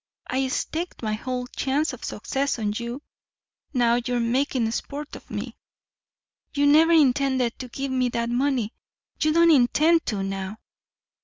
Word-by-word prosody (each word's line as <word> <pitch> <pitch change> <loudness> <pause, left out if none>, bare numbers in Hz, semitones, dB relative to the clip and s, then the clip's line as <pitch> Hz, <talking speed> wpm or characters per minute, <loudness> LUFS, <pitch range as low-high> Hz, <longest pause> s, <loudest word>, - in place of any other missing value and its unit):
I 265 +1 0
staked 320 +4 -3
my 215 -1 -1
whole 250 +3 -3
chance 275 +5 -1
of - - -10
success 275 0 -2
on 210 -2 -1
you 240 +5 -5 0.7
now 240 -3 +3
you're 245 0 -1
making 240 -1 +1
sport 290 +5 -5
of - - -13
me. - - -5 1.0
You 285 0 +3
never 310 +3 +6
intended 265 -5 +3
to 255 - -5
give 270 +2 -4
me 255 -1 +1
that 235 0 -2
money 250 -3 0 0.5
you 310 - +3
don't 335 +1 +5
intend 310 +5 +4
to 205 -4 -1
now." 195 +1 -4
255 Hz, 150 wpm, -25 LUFS, 235-285 Hz, 1.0 s, never